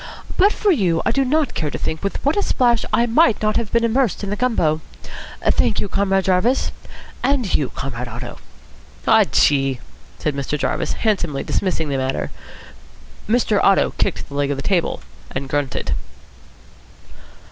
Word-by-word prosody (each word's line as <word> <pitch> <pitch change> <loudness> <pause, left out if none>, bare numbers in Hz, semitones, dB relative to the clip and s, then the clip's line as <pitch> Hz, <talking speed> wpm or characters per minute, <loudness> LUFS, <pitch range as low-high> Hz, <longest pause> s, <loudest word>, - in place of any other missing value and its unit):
But 400 +3 +5
for 420 -2 +1
you 180 - +1
I - - +3
do 275 - +2
not 290 +1 +1
care 155 - -2
to - - -5
think 160 - -3
with 200 - -1
what 285 - +3
a 410 - +2
splash 240 - +2
I 230 +2 +3
might 240 +1 +3
not 215 0 0
have 230 -3 -2
been 235 0 +2
immersed 230 -2 +1
in 200 - -3
the - - 0
gumbo. 175 -10 +1 0.6
Thank - - +2
you, - - -1
Comrade 195 0 +1
Jarvis. 195 +8 +2 0.5
And 255 -6 +1
you, 140 - +1
Comrade 125 -2 -5
Otto." 120 +1 -7 0.7
"Aw - - +6
chee!" 135 -3 +2 0.4
said 150 - -1
Mr. 140 +2 -2
Jarvis, - - -1
handsomely 175 -10 -1
dismissing 165 -5 -1
the 140 - 0
matter. 130 0 -2 1.0
Mr. 220 -3 +2
Otto 195 - +4
kicked 195 - -1
the 140 - -12
leg 140 0 0
of 145 - -1
the 135 - -5
table, 180 -2 0 0.3
and 135 +1 -4
grunted. 140 - -2
195 Hz, 170 wpm, -20 LUFS, 145-235 Hz, 1.0 s, Aw